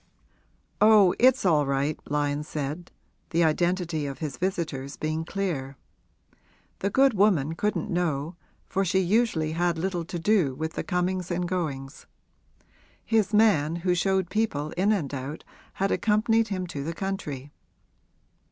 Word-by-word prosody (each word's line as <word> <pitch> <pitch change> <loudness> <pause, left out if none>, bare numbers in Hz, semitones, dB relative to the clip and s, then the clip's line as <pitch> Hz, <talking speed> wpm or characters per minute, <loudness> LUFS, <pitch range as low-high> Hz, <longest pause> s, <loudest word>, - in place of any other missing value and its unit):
'Oh, 210 -4 +6
it's 260 -2 +4
all 150 -5 +3
right,' 140 +2 0
Lyon 145 0 0
said, 150 +3 -5 0.4
the 170 +1 +2
identity 170 -1 0
of 135 -2 -6
his 145 -2 -4
visitors 155 -6 -3
being 155 +1 -2
clear. 160 -8 -3 1.0
The 200 - 0
good 270 +4 +4
woman 185 -8 +2
couldn't 210 +6 -2
know, 165 -2 -1 0.3
for 195 0 0
she 190 +1 +1
usually 190 -4 +1
had 170 +1 0
little 175 0 -2
to 175 - -5
do 170 -6 +2
with 160 +3 -4
the - - -3
comings 180 0 -1
and 175 0 -1
goings; 150 -5 -4 1.0
his 220 -3 +2
man, 205 -8 +3
who 180 - +3
showed 190 0 0
people 155 -9 -1
in 195 +4 +1
and 160 -10 -1
out, 140 +3 -5 0.3
had 195 +1 -1
accompanied 225 +1 +2
him 185 -3 -3
to 145 -5 -5
the 165 +3 -3
country. 150 -9 -4
175 Hz, 145 wpm, -26 LUFS, 150-195 Hz, 1.0 s, Oh